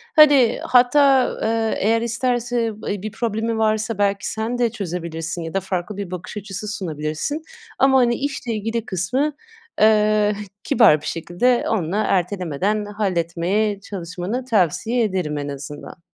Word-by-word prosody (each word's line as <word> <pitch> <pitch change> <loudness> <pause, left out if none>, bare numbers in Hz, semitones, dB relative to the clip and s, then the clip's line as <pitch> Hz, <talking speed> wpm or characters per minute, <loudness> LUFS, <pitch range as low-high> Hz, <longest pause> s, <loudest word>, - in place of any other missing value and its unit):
hani, 290 -6 +6
hatta, 260 +1 +5 0.2
ııı, 225 0 +1
eğer 225 +3 +2
isterse, 235 0 0
ı 215 0 -13
bir 205 +1 -3
problemi 225 0 -2
varsa, 220 0 0
belki, 200 -1 0
sen 225 +3 -3
de 240 -1 +2
çözebilirsin 170 -5 -4
ya 165 - -6
da 195 - +1
farklı 190 +1 -4
bir 195 -3 -5
bakış 180 +3 -6
açısı 200 +1 -6
sunabilirsin. 160 - -3 0.4
Ama, 265 0 +5
hani, 240 -1 +3
işle 270 -4 -3
ilgili 225 +2 -3
kısmı, 255 - -1 0.5
eee, 215 -1 +4
h 210 - -6 0.2
kibar 225 - +5
bir - - -11
şekilde 175 +9 0
onunla 195 -2 -1
ertelemeden 190 +2 0
halletmeye 200 0 -1
çalışmanı 190 +5 -5
tavsiye 225 - +1
ederim, 180 -8 -1
en 145 0 -4
azından. 145 +4 -8
210 Hz, 140 wpm, -21 LUFS, 180-235 Hz, 0.5 s, hani